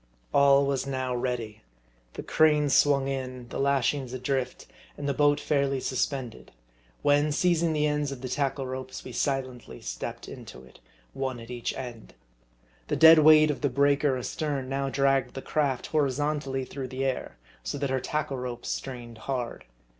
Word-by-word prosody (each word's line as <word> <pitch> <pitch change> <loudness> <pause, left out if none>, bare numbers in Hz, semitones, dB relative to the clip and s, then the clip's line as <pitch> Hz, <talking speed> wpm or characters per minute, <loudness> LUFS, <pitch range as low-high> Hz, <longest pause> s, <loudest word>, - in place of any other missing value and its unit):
All 140 0 +5
was 140 -1 -1
now 130 -2 -2
ready: 120 -3 -3 0.5
the - - -6
cranes 150 -3 +3
swung 140 -2 +4
in, 130 -2 -4
the - - -5
lashings 140 -1 +1
42 - - -3
MARDI. - - -5 0.2
adrift, 125 0 -10 0.3
and 145 - -4
the 140 - +1
boat 145 +1 +3
fairly 140 -2 0
suspended; 130 -2 -3 0.5
when, 145 +1 +3
seizing 170 +1 +2
the 150 -1 +1
ends 150 -1 0
of 135 -3 -7
the 130 - -4
tackle 135 +1 -1
ropes, 130 0 -6
we 130 - -8
silently 130 -2 -3
stepped - - -6
into - - -10
it, 65 - -18 0.3
one 130 -2 -3
at 115 +1 -10
each 120 -1 -4
end. 120 - -8 0.7
The - - 0
dead 160 0 +9
weight 155 0 +7
of 145 - -6
the 145 - +2
breaker 140 +1 +2
astern 140 +1 -3
now 135 +1 -1
dragged 135 -2 +1
the 135 - -4
craft 140 -5 0
horizontally 145 -2 -1
through 135 0 -6
the 130 +1 -3
air, 130 - -3 0.2
so - - -4
that 140 -1 -2
her 130 - +1
tackle 140 0 -2
ropes 125 -1 -5
strained 120 -4 -6
hard. 125 -3 -3
135 Hz, 170 wpm, -27 LUFS, 130-145 Hz, 0.7 s, dead